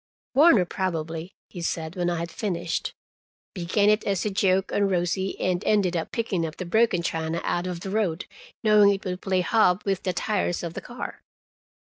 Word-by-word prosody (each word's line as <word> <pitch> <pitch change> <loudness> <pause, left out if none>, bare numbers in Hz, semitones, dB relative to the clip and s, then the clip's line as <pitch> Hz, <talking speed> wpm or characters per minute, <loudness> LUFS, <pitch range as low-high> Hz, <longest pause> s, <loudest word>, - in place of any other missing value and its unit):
"Warner 270 - +6
probably," 165 -1 -3
he 175 - -8
said 160 -1 -3
when 175 -1 0
I 175 - -1
had 170 +1 -4
finished. 175 -5 -3 0.6
"Began 190 +3 +1
it 210 +1 +1
as 195 -1 -1
a 210 - 0
joke 190 0 +2
on 200 -1 +2
Rosie, 185 +1 -1
and 185 0 0
ended 200 -4 +2
by 165 -2 -1
picking 215 -7 -2
up 160 -1 -4
the 185 - -4
broken 190 -1 +2
china 160 0 -2
out 175 +1 -1
of 175 -2 -4
the 190 - -5
road, 195 -5 0 0.4
knowing 210 -2 +6
it 200 0 -3
would 180 0 -3
play 190 -2 +1
hob 185 0 +3
with 195 -1 0
the 185 - -1
tires 180 -1 -1
of 170 -1 -4
the - - -6
car." 245 +1 -7
185 Hz, 190 wpm, -25 LUFS, 170-205 Hz, 0.6 s, Warner